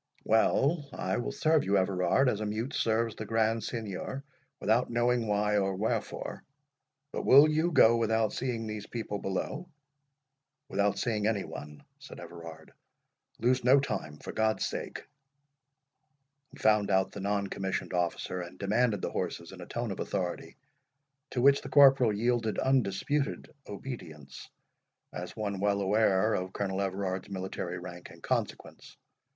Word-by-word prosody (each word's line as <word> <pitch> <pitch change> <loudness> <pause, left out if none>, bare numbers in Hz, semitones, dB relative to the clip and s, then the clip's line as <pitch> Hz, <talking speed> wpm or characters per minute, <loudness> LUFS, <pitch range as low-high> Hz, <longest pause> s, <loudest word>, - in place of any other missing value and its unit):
"Well, 140 +7 +2
I 95 - -2
will 120 - -2
serve 155 -1 +2
you, 100 +1 +2
Everard, 95 +7 +2
as 110 -4 0
a - - -1
mute 110 +6 -3
serves 115 0 +1
the 110 - -6
Grand 115 +1 +1
Signior, 115 +4 -5 0.4
without 115 +4 +2
knowing 120 0 +1
why 105 0 +1
or 95 -1 0
wherefore. 105 +4 -3 0.7
But - - -3
will 140 +3 +8
you 155 +3 +1
go 115 -7 +6
without 110 -1 +1
seeing 120 -3 -2
these 110 -1 -6
people 110 -3 -4
below?" 135 - -3 1.0
"Without 100 0 +1
seeing 110 -4 0
any 105 -3 0
one," 75 -1 -9 0.2
said - - -11
Everard; 85 -2 -10 0.7
"lose 125 +3 +2
no 130 +3 +6
time, 85 - -4
for - - -8
God's 110 0 +1
sake." - - -5 1.4
He - - -15
found 105 -2 +3
out 95 -1 +2
the - - -8
non 100 +1 0
commissioned 95 -1 -3
officer, 90 +1 -1
and 85 - -9
demanded 105 0 +1
the - - -2
horses - - -4
in - - -10
a - - -9
tone - - -3
of - - -6
authority, 90 -3 -3 0.7
to 125 - -2
which 140 0 +6
the - - -8
corporal 135 -5 +6
yielded 115 +1 0
undisputed 130 +3 0
obedience, 80 - -8 0.6
as 90 +1 -6
one 100 -3 -3
well 100 0 +1
aware 100 +1 +3
of 95 0 -2
Colonel 95 -1 -2
Everard's 95 0 -2
military 95 -2 -4
rank 90 -1 -9
and - - -15
consequence. - - -4
105 Hz, 150 wpm, -30 LUFS, 95-120 Hz, 1.4 s, will